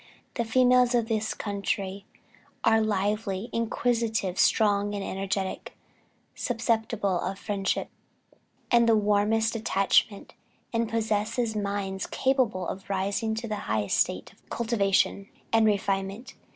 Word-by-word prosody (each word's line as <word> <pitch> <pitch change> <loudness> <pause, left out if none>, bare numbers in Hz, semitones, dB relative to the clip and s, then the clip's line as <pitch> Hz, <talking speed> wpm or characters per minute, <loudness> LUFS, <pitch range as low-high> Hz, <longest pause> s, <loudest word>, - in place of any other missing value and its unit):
"The 235 - -1
females 250 +1 +4
of 235 -2 +1
this 220 -1 -1
country 200 -1 -3 0.6
are 225 0 +4
lively, 205 0 -1
inquisitive, 230 -4 0
strong 205 -1 +3
and 200 - -3
energetic, 195 0 -3 0.6
susceptible 225 -5 -1
of 190 +2 -3
friendship 200 -2 -2 0.8
and 235 -1 +5
the 225 - +6
warmest 210 +2 +2
attachment, 200 -2 +1 0.4
and 230 -1 0
possess 220 0 -1 0.2
minds 200 -2 -2
capable 250 -9 0
of 195 - -7
rising 200 +3 -1
to 230 +1 -4
the 215 -1 -3
highest 105 -1 +1
state - - -1
of - - -30
cultivation 200 -3 +1 0.2
and 225 -1 +5
refinement.... 195 +2 -1
210 Hz, 115 wpm, -27 LUFS, 195-230 Hz, 0.8 s, the